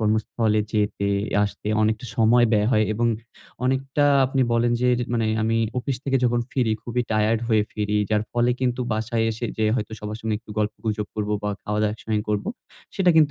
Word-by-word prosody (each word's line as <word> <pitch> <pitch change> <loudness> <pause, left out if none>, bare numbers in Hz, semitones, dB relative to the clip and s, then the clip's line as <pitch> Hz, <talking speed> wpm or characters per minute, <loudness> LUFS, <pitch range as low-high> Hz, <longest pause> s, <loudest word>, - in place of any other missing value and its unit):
কর্মস্থলে 110 0 +1
যেতে-আসতে 105 0 0
অনেকটা 110 +3 0
সময় 120 +1 +5
ব্যয় 105 0 +3
হয় 110 -2 +4
এবং 120 +2 0 0.6
অনেকটা 135 +2 +1 0.2
আপনি 135 0 +1
বলেন 120 0 +2
যে 125 - +3 0.2
মানে 115 -2 +1 0.2
আমি 115 +1 +1 0.2
অফিস 130 +1 -2
থেকে 135 -1 +2
যখন 120 0 +2
ফিরি 120 -5 +1
খুবই 120 +1 -2
টায়ার্ড 110 +1 +2
হয়ে 110 -2 +4
ফিরি। 105 0 -1
যার 105 -1 +2
ফলে 120 0 +2
কিন্তু 125 -1 0
বাসায় 115 +1 0
এসে 110 +2 -5
যে 110 - +1
হয়তো 110 -3 -3
সবার 105 0 -5
সঙ্গে 110 -1 -1
একটু 110 - -16
গল্পগুজব 105 0 -2
করব 105 -1 -2
বা 105 - -1
খাওয়াদাওয়া 105 0 0
একসঙ্গেই 110 -1 -2
করব, 105 -1 0 0.5
সেটা 185 -3 +4
কিন্তু 155 -2 +5
110 Hz, 175 wpm, -23 LUFS, 105-120 Hz, 0.6 s, সময়